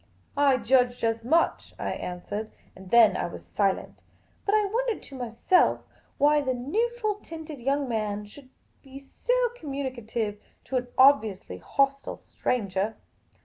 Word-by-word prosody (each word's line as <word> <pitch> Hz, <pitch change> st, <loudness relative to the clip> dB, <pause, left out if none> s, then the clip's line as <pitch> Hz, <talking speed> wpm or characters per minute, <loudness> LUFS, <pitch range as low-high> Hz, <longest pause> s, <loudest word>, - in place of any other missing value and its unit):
" -, -, -39 dB
I 280 Hz, -2 st, +4 dB
judged 245 Hz, +1 st, +2 dB
as 225 Hz, 0 st, 0 dB
much," 325 Hz, +8 st, +1 dB
I -, -, -3 dB
answered. 205 Hz, +5 st, -5 dB, 0.3 s
And 190 Hz, -1 st, -12 dB
then 230 Hz, 0 st, +6 dB
I -, -, -1 dB
was 170 Hz, -, -10 dB
silent. 195 Hz, -2 st, 0 dB, 0.5 s
But 405 Hz, -, +4 dB
I 425 Hz, -1 st, +3 dB
wondered 465 Hz, +2 st, -1 dB
to 275 Hz, -, -11 dB
myself 245 Hz, -, +2 dB, 0.3 s
why 295 Hz, +1 st, +4 dB
the 260 Hz, -2 st, -1 dB
neutral 430 Hz, -, -1 dB
tinUd 320 Hz, -, -9 dB
young 275 Hz, +1 st, +1 dB
man 210 Hz, -3 st, -2 dB
should 255 Hz, +6 st, -15 dB, 0.3 s
be 270 Hz, -1 st, -12 dB
so -, -, 0 dB
communicative 240 Hz, -, -4 dB, 0.2 s
to 265 Hz, -, -2 dB
an 250 Hz, 0 st, -2 dB
obviously 255 Hz, -8 st, +4 dB
hostile 275 Hz, 0 st, 0 dB
stranger. 200 Hz, -2 st, -2 dB
260 Hz, 145 wpm, -27 LUFS, 225-295 Hz, 0.5 s, then